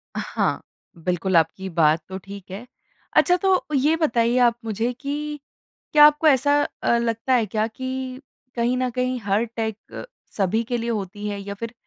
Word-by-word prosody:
अ, - - -2
हाँ, - - -1 0.4
बिल्कुल 180 +1 0
आपकी 175 +4 0
बात 160 -2 +3
तो 190 - -5
ठीक 195 0 -11
है। 200 +6 -7 0.5
अच्छा 355 - +5
तो 380 0 +2
ये 295 +4 +3
बताइए 240 -6 +1
आप 235 - 0
मुझे 225 +2 -1
कि 295 +3 -5 0.5
क्या 295 -1 +9
आपको 300 +1 +4
ऐसा 285 +1 +4 0.2
अ, 235 - +3
लगता 230 +2 -1
है 240 -3 +3
क्या 215 +2 -1
कि 260 +2 -5 0.3
कहीं 240 +1 +1
न 255 0 0
कहीं 250 +1 -1
हर 205 +3 +1
टेक 220 -2 -2 0.2
क - - -6 0.3
सभी 210 +3 +1
के 240 +1 -2
लिए 235 0 -3
होती 205 -1 -4
है 205 -1 -3
या 200 0 -6
फ़िर 230 0 -5
235 Hz, 180 wpm, -23 LUFS, 200-260 Hz, 0.5 s, क्या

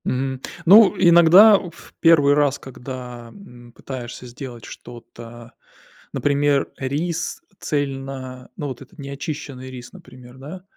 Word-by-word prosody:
Мгм. 130 0 -2 0.2
Ну, 200 +3 +7
иногда 175 +4 +7
в 170 -3 -12
первый 150 -4 +5
раз, 145 -1 +1
когда, 125 -2 -9
м, 120 -11 -15
пытаешься 125 -1 -8
сделать 120 -1 -10
что-то, 120 0 -12 0.6
например, 145 0 +1
рис 155 - -3 0.2
цельно 135 -3 -5
Ну, 145 - -4
вот 130 -2 -7
этот 135 - -16
неочищенный 140 -1 -7
рис, 125 -1 -10
например, 125 0 -15
да. 155 +8 -10
135 Hz, 115 wpm, -21 LUFS, 125-150 Hz, 0.6 s, Ну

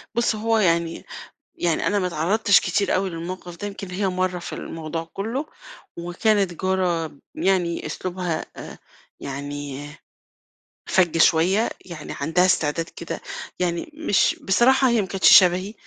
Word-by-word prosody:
بُص، 235 -1 +2
هو 225 +1 +1
يعني 170 -4 +1 0.5
يعني 170 -2 0
أنا 205 - +2
ما 185 - 0
اتعرّضتش 195 +5 +3
كتير 200 +3 0
أوي 190 +1 0
للموقف 175 +1 -7
ده، 205 - -4
يمكن 195 -2 -8
هي 195 +2 -1
مرّة 185 -1 -1
في 175 - -7
الموضوع 165 0 -5
كُلّه، 230 +9 -3 0.5
وكانت 180 +2 +1
جارة 180 -3 0 0.2
يعني 180 -3 0
أسلوبها 180 -3 -3
أ - - -9 0.4
يعني 145 0 -6 1.0
فَج 180 -3 +3
شوية، 175 +7 +4 0.2
يعني 170 -5 -8
عندها 165 +5 +2
استعداد 165 -2 +1
كده - - -7 0.4
يعني 175 - -2
مش 305 - +2
بصراحة 260 +6 +4
هي 235 -2 +3
ما 190 - -4
كانتش 190 +1 +7
شبهي 185 +3 +3
180 Hz, 135 wpm, -23 LUFS, 165-200 Hz, 1.0 s, كانتش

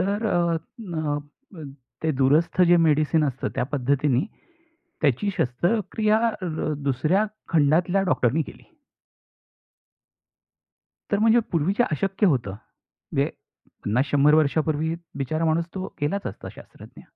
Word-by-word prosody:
तर 200 +4 0
अ, 170 -4 +1 0.2
न 160 -8 -3 0.4
अ, 160 -4 -9 0.4
ते 160 - +1
दूरस्थ 150 +7 +3
जे 175 - +6
मेडिसिन 155 +1 +2
असतं 135 -2 -2
त्या - - 0
पद्धतीनी, 140 - +1 0.8
त्याची 145 - +1
शस्त्रक्रिया 210 - +1 0.2
अ, - - -3 0.4
दुसऱ्या 155 - +1 0.2
खंडातल्या 170 +5 +3
डॉक्टरनी 130 +6 +2
केली. - - -12 2.5
तर 205 - +3
म्हणजे 225 +2 +4
पूर्वी 165 +2 +1
जे 245 - +5
अशक्य 195 +7 0
होतं. 130 - +1 0.4
म्हणजे - - -3 0.6
50-100 140 +6 +3
वर्षापूर्वी 155 +1 +1 0.2
बिचारा 155 +4 -1
माणूस 165 +1 +1
तो 190 0 -3 0.2
गेलाच 195 +7 -1
असता - - -8
शास्त्रज्ञ. - - -14
160 Hz, 115 wpm, -24 LUFS, 145-185 Hz, 2.5 s, जे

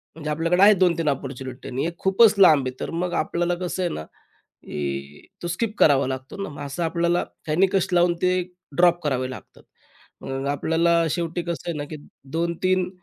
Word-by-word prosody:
म्हणजे 155 -2 -6
आपल्याकडे 165 +4 +1
आहे 210 +1 +9
2-3 170 -5 +2
अपॉर्च्युनिट 130 -2 -5
आणि 130 +4 -2
एक 170 - -7
खूपच 195 +3 +5
लांब 155 -8 +6
आहे 130 0 -7
तर - - -4
मग 180 -1 -2
आपल्याला 175 +2 0
कसं 180 +1 -3
आहे 175 - 0
ना 80 - -5
की 70 -2 -8 0.2
तो - - -2
स्किप 210 +6 -2
करावा 140 -3 +5
लागतो 130 +5 -6
ना, - - -5
मग 145 - -9
असं 140 +4 -4
आपल्याला 170 +1 +1 0.3
निकष 190 0 +3
लावून 175 0 +4
ते 185 0 +2 0.4
ड्रॉप 175 0 +4
करावे 130 -3 -1
लागतात - - -12 0.9
आपल्याला. 165 +3 +2
शेवटी 170 +1 -2
कसं 170 0 -5
आहे 170 - -2
ना 145 - -3
की 155 - -6 0.4
2-3 175 +2 0
170 Hz, 175 wpm, -23 LUFS, 140-180 Hz, 0.9 s, आहे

